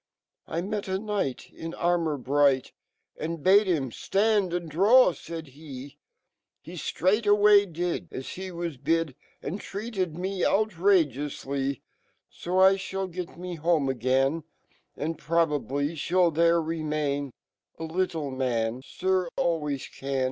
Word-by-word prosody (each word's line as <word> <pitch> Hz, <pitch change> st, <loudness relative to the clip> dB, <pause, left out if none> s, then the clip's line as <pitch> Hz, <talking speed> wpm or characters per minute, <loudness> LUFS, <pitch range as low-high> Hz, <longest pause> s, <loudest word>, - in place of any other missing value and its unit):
u -, -, -6 dB
I 170 Hz, -, +1 dB
met 205 Hz, +1 st, -3 dB
a 190 Hz, 0 st, 0 dB
knifcht 200 Hz, -, -3 dB
In 165 Hz, +1 st, -7 dB
armo 170 Hz, -2 st, +1 dB
r -, -, -3 dB
bright, 140 Hz, 0 st, +2 dB, 0.5 s
And 160 Hz, -1 st, -4 dB
bade 200 Hz, +2 st, +6 dB
him 145 Hz, -9 st, 0 dB, 0.2 s
(land 205 Hz, -2 st, +3 dB
and 175 Hz, -1 st, -2 dB
draw/'faid 170 Hz, -, +3 dB
Ke 135 Hz, -, -17 dB
<C 140 Hz, -2 st, -10 dB, 0.7 s
H0 190 Hz, +7 st, 0 dB
rtraightway 205 Hz, -2 st, +5 dB
did 175 Hz, +1 st, -2 dB
As 130 Hz, -, -6 dB
he 190 Hz, +1 st, -6 dB
was 170 Hz, -4 st, -4 dB
bid, 160 Hz, +2 st, 0 dB, 0.3 s
A -, -, -3 dB
rid 190 Hz, -, -4 dB
treated 195 Hz, -6 st, -4 dB
mo 190 Hz, +1 st, -3 dB
outragcoufly, 150 Hz, -, +1 dB, 0.5 s
Sol 190 Hz, +2 st, +3 dB
(hall 190 Hz, 0 st, -3 dB
got 175 Hz, -1 st, -6 dB
me 180 Hz, 0 st, -5 dB
home 160 Hz, -3 st, +2 dB
again 135 Hz, +5 st, +1 dB, 0.3 s
> -, -, -39 dB
And 160 Hz, +1 st, -3 dB
probably 145 Hz, -5 st, 0 dB
fhall 170 Hz, +2 st, +1 dB
fhere 170 Hz, 0 st, +3 dB
remairb 150 Hz, -3 st, -2 dB, 0.5 s
Alittle 160 Hz, -4 st, -2 dB
man, 120 Hz, -2 st, -1 dB
Sir, 185 Hz, +3 st, 0 dB
always 150 Hz, -5 st, 0 dB
can. 135 Hz, 0 st, -4 dB
165 Hz, 135 wpm, -27 LUFS, 145-185 Hz, 0.7 s, bade